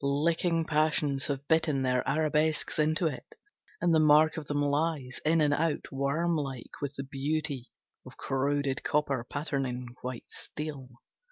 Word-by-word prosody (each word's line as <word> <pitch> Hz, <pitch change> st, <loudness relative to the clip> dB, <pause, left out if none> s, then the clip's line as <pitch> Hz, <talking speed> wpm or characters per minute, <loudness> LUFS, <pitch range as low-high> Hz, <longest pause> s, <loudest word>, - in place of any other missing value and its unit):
Licking 165 Hz, +4 st, +1 dB
passions 150 Hz, -3 st, +1 dB
have 140 Hz, 0 st, -3 dB
bitten 160 Hz, -4 st, +2 dB
their 125 Hz, -1 st, +2 dB
arabesques 155 Hz, +1 st, +1 dB
into 155 Hz, +3 st, +2 dB
it, 145 Hz, -6 st, -4 dB, 0.4 s
And 175 Hz, -1 st, +2 dB
the 160 Hz, -, +5 dB
mark 155 Hz, +1 st, +5 dB
of 155 Hz, -3 st, -6 dB
them 145 Hz, 0 st, -1 dB
lies, 145 Hz, -2 st, 0 dB
in 160 Hz, +1 st, +3 dB
and 145 Hz, -1 st, +3 dB
out, 160 Hz, +1 st, -1 dB
Worm 140 Hz, +6 st, 0 dB
like, 135 Hz, -6 st, -4 dB
With 140 Hz, 0 st, -3 dB
the 135 Hz, -, -4 dB
beauty 140 Hz, -1 st, -3 dB, 0.3 s
of -, -, -13 dB
corroded 140 Hz, 0 st, 0 dB
copper 145 Hz, -5 st, +1 dB
patterning 130 Hz, -3 st, -3 dB
white 125 Hz, -1 st, -5 dB
steel. 145 Hz, -4 st, -7 dB
145 Hz, 150 wpm, -29 LUFS, 135-155 Hz, 0.4 s, the